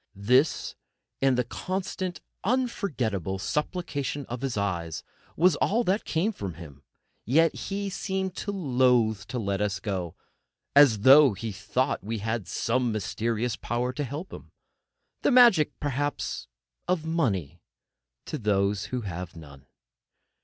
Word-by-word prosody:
This, 125 +10 +2 0.5
and 135 -2 +3
the 125 - +2
constant, 185 +6 -4 0.2
unforgettable 145 - -1
supplication 145 - -2
of 120 +1 -6
his 135 -5 -2
eyes, 85 -5 -2 0.3
was 175 0 +4
all 230 +5 +2
that 200 +1 0
came 175 +7 0
from 95 - -6
him; 75 -5 -11 0.4
yet 160 +8 +3
he 200 0 -4
seemed 190 -1 -3
loath 125 - +2
to 130 - -4
let 100 -3 -1
us 100 -1 -1
go, 90 -5 -3 0.6
as 135 -8 +7
though 135 +1 +8
he 110 +3 -5
thought 130 +4 -1
we 110 +3 -3
had 110 -2 -3
some 120 +5 0
mysterious 115 +3 -1
power 120 +2 -2
to 145 - -2
help 145 +7 -6
him—the - - -8
magic, 240 - +5
perhaps, 145 - -2 0.4
of 175 -3 0
money, 120 - -1 0.6
to 155 - -4
those 100 -2 +1
who 125 -1 -3
have 90 -4 -6
none. 70 -4 -13
125 Hz, 130 wpm, -27 LUFS, 100-160 Hz, 0.6 s, though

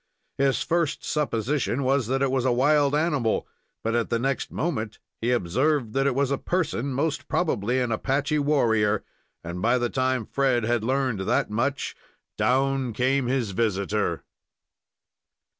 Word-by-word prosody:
His 135 -1 +2
first 170 -3 0
supposition 140 -1 -1
was 130 -2 +1
that 135 +2 0
it 135 - +1
was 130 -2 +1
a 130 - +2
wild 145 +3 +3
animal, 150 -8 0 0.4
but 115 +1 0
the 115 - +1
next 135 +3 -2
moment 115 -10 -2 0.2
he 115 - 0
observed 125 - +1
that 135 +1 +2
it 135 - +1
was 140 0 +1
a 140 - 0
person, 150 -7 -1
most 145 +3 -1
probably 125 - 0
an 125 -2 -1
Apache 140 +6 0
warrior. 110 -8 +2 0.4
And 85 +1 -5
by 120 +4 +3
the 120 -1 -1
time 130 -3 0
Fred 130 -2 +1
had 115 0 0
learned 130 -3 0
that 95 +2 0
much, 130 +6 -1 0.4
down 135 -1 +1
came 130 +3 +1
his 125 -5 0
visitor. 100 -3 -1
130 Hz, 150 wpm, -25 LUFS, 115-140 Hz, 0.4 s, wild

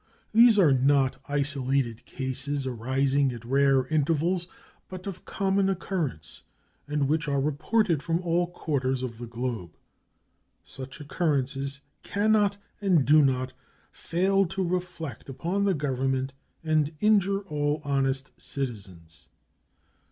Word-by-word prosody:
These 230 0 +7
are 170 -8 +6
not 135 0 +2
isolated 135 -4 -1
cases, 135 +1 -3
arising 130 +3 +1
at 120 -1 -9
rare 135 0 +3
intervals, 160 +4 +1 0.4
but 185 -1 -8
of 195 -3 -7
common 195 0 +1
occurrence, 165 - -3 0.5
and 145 -1 0
which 155 +2 0
are 140 -1 +1
reported 155 +4 +1
from 165 +2 0
all 175 0 +1
quarters 135 -7 -2
of 115 -3 -5
the 120 - -6
globe. 115 -7 -5 0.9
Such 135 +2 -9
occurrences 140 -3 -1 0.2
can 205 +2 0
not, 205 -2 +3 0.2
and 180 -9 +3
do 155 +1 +6
not, 130 -2 +1 0.4
fail 195 +2 +1
to 190 +1 -2
reflect 170 -8 -4
upon 175 +9 -1
the 195 -2 +2
Government 135 -2 -1 0.3
and 155 -1 +1
injure 200 -1 +3
all 150 -5 -1
honest 135 -1 0
citizens. 95 - -7
145 Hz, 120 wpm, -27 LUFS, 130-175 Hz, 0.9 s, These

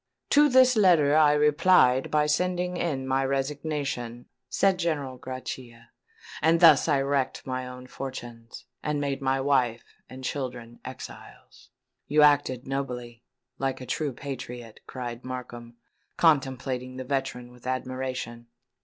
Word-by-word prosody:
"To 295 +1 +6
this 255 -1 +6
letter 170 -8 +5
I 150 -1 +6
replied 150 -3 +4
by 150 -1 +2
sending 180 +3 0
in 140 -7 -2
my 135 +1 +1
resignation," 135 -3 -3 0.2
said 195 -2 +2
General 145 -7 -2
Grachia; 125 -3 -8 0.5
"and 165 +2 +4
thus 160 -4 +7
I 145 -3 +3
wrecked 135 -1 -1
my 130 -1 -3
own 125 0 -9
fortunes, 120 -3 -8 0.2
and 150 -1 -1
made 140 -1 -2
my 135 0 +1
wife 130 -4 +1 0.3
and 130 0 -10
children 125 -4 -5
exiles." 130 +1 -11 0.4
"You 150 +1 +4
acted 145 -4 +3
nobly—like 130 0 -5
a 130 - -7
true 145 +3 -2
patriot," 125 -4 -8
cried 120 -2 -6
Markham, 120 -2 -7 0.4
contemplating 130 -4 +1
the 130 - -4
veteran 130 -2 -3
with 125 0 -13
admiration. 130 -2 -4
130 Hz, 125 wpm, -27 LUFS, 125-150 Hz, 0.5 s, thus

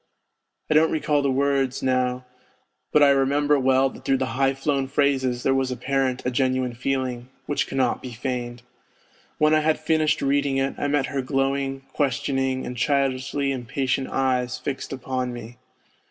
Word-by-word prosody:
I - - +1
don't 160 +1 +5
recall 150 -2 +1
the 140 - +1
words 135 -1 0
now, 125 -1 0 0.7
but 150 - +5
I 140 - +6
remember 140 +2 +2
well 130 0 +3
that - - -13
through 135 - +2
the 130 - -1
high 135 0 +2
flown 135 0 -1
phrases 130 -3 +1
there 135 - +3
was 135 -1 +1
apparent 130 +1 -1
a 125 - +1
genuine 130 -1 0
feeling, 125 -1 -2 0.2
which 145 - -1
cannot 130 -2 0
be 130 - -7
feigned. 120 0 -4 0.7
When 155 0 +3
I 155 - +5
had 155 0 +1
finished 155 -1 +1
reading 140 0 +1
it 135 0 0
I 145 - 0
met 145 -1 +1
her 135 - 0
glowing, 135 0 -1
questioning, 135 -1 0
and 125 - -5
childishly 140 +1 0
impatient 130 +1 -2
eyes 125 -1 0
fixed 140 -2 -5
upon 130 -1 -3
me. 120 +1 -9
135 Hz, 165 wpm, -24 LUFS, 130-140 Hz, 0.7 s, I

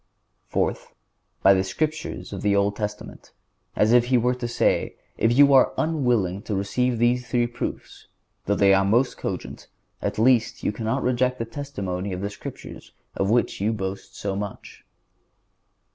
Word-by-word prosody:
Fourth—By 100 - -1
the 95 0 +2
Scriptures 155 +7 -3
of 100 - -5
the 100 -1 +2
Old 100 +1 +2
Testament; 105 -1 -6 0.4
as 110 +2 +3
if 120 -1 +5
He 125 +1 +3
were 125 +1 +2
to 125 -1 -4
say, 120 - 0 0.2
"If 115 +3 +2
you 140 0 +7
are 130 - +5
unwilling 125 - 0
to 105 - 0
receive 120 +6 0
these 120 +2 +1
three 120 +1 +1
proofs, 120 +1 -6 0.4
though 100 - +2
they 100 -1 +5
are 95 0 +4
most 120 +7 +2
cogent, - - -6 0.3
at - - -2
least 115 0 +2
you - - +1
cannot 110 +1 -2
reject 125 0 +1
the 115 - -3
testimony 100 -8 -5
of 90 - -5
the 100 +1 -3
Scriptures, - - -10 0.2
of 95 - 0
which 120 -3 +1
you 105 +3 +1
boast 95 -2 -6
so 100 -1 -3
much." 100 0 -7
115 Hz, 160 wpm, -24 LUFS, 100-125 Hz, 0.4 s, you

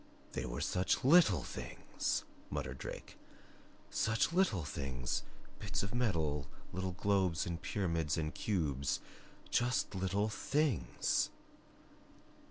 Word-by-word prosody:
"They 65 - -3
were - - -3
such 90 +8 +1
LITTLE 130 - +6
THINGS," - - -3 0.3
muttered 65 0 -3
Drake. - - -7 0.7
"Such 115 +9 +2
little 170 - +3
things 65 -4 -2 0.4
bits 95 -3 -1
of 100 - -3
metal 80 - +1 0.3
little 95 0 -2
globes 95 -3 +2
and 85 -1 -3
pyramids 85 -6 0
and 75 0 -1
cubes 75 -9 0 0.5
just 125 -1 +2
little 95 +2 +1
THINGS." 140 - +1
95 Hz, 105 wpm, -35 LUFS, 75-105 Hz, 0.7 s, LITTLE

